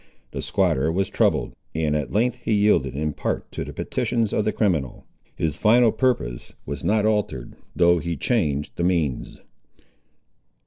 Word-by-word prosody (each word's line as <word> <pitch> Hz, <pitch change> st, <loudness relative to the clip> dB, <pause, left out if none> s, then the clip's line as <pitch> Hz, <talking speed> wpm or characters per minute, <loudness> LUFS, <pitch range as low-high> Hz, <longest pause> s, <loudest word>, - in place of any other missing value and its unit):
The -, -, -4 dB
squatter 75 Hz, +5 st, +1 dB
was 95 Hz, +2 st, 0 dB
troubled, -, -, +1 dB, 0.2 s
and 80 Hz, -2 st, 0 dB
at 75 Hz, -2 st, -1 dB
length 115 Hz, +4 st, +1 dB
he -, -, -2 dB
yielded 100 Hz, -11 st, +2 dB
in 75 Hz, +1 st, -1 dB
part -, -, -3 dB
to -, -, -4 dB
the -, -, -7 dB
petitions 115 Hz, -3 st, -1 dB
of 105 Hz, -, +1 dB
the 110 Hz, -, +2 dB
criminal. 85 Hz, -, -1 dB, 0.3 s
His 75 Hz, -2 st, -2 dB
final 115 Hz, +1 st, +5 dB
purpose 115 Hz, -, -1 dB
was 70 Hz, 0 st, -5 dB
not 105 Hz, 0 st, +2 dB
altered, 105 Hz, -, -1 dB, 0.2 s
though 85 Hz, +1 st, +4 dB
he 85 Hz, +1 st, -3 dB
changed 75 Hz, -, 0 dB
the 85 Hz, -, -1 dB
means. 85 Hz, -7 st, -1 dB
85 Hz, 160 wpm, -23 LUFS, 75-105 Hz, 0.3 s, final